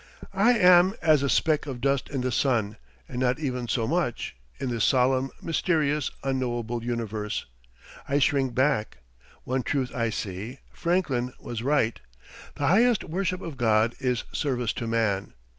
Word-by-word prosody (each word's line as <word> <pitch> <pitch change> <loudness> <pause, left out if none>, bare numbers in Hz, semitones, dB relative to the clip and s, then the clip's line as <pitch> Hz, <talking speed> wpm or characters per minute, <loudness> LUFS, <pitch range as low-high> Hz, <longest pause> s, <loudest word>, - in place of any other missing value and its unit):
I 210 +6 +4
am 180 0 +6
as 155 -3 +5
a 140 - 0
speck 155 +1 +2
of 130 -3 -5
dust 135 +1 0
in 135 -2 -2
the 130 0 -1
sun, 110 -5 +1 0.3
and 125 - -5
not 125 +1 +1
even 125 -5 -3
so 115 -1 0
much, 160 -6 -1 0.2
in 130 - -2
this 115 -3 0
solemn, 130 +2 +3
mysterious, 155 -3 +1
unknowable 120 -3 -2
universe. 110 -3 -3 0.6
I 140 - +2
shrink 135 -2 +1
back. 130 -5 +1 0.5
One 130 +1 -1
truth 130 0 -2
I 115 -2 0
see. 105 +4 -5 0.2
Franklin 140 -9 0
was 115 -2 -5
right. 125 -3 +1 0.6
"The 145 - -2
highest 225 +6 +4
worship 185 +2 -2
of 160 -5 -7
God 115 0 +3
is 125 -3 0
service 125 -6 -1
to 115 - -4
Man." 105 - 0
130 Hz, 155 wpm, -26 LUFS, 115-150 Hz, 0.6 s, am